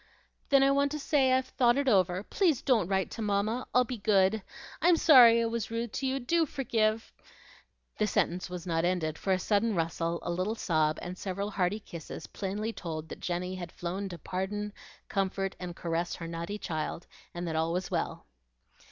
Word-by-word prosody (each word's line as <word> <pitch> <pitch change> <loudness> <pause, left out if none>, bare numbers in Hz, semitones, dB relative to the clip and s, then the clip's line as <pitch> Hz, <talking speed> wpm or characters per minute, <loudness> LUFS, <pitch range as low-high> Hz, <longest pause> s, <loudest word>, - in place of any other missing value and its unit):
"Then 275 -1 +6
I 275 - +5
want 280 0 +2
to 300 - -3
say, 275 -2 +2
I've 260 0 +3
thought 245 -1 +2
it 280 -1 0
over. 185 -4 +3
Please 320 - +1
DON'T 235 -10 +3
write 190 -1 0
to 230 - -6
mamma. 210 +3 0
I'll 250 - +5
be 245 -1 -6
good. 200 +1 +3 0.4
I'm 340 +1 +5
sorry 240 -8 +8
I - - +1
was 230 -1 -2
rude 230 -1 -3
to 265 - -1
you; 265 +1 0
do 325 +6 +1
forgive 225 -5 0 0.4
" - - -31
The 215 - +2
sentence 180 -2 0
was 180 -1 -6
not 165 -2 0
ended, 170 -3 0
for 195 - -1
a 185 - +4
sudden 210 +3 +1
rustle, 165 0 -1
a 175 - -2
little 185 +6 -1
sob, 155 -7 +1
and 180 +1 -6
several 200 +2 -3
hearty 195 +1 0
kisses 170 -6 -8
plainly 210 +3 -4
told 160 -5 -6
that - - -8
Jenny 180 +1 -3
had 175 -3 -6
flown 190 +3 -4
to 175 - -7
pardon, 200 +5 -4 0.3
comfort, 195 -1 -1
and 180 -2 -6
caress 170 +1 -2
her 165 - -7
naughty 170 +5 -4
child, 160 -2 -4 0.3
and 175 0 -4
that 160 - -2
all 160 +1 +1
was 180 +2 -2
well. - - -2
200 Hz, 195 wpm, -30 LUFS, 175-235 Hz, 0.4 s, sorry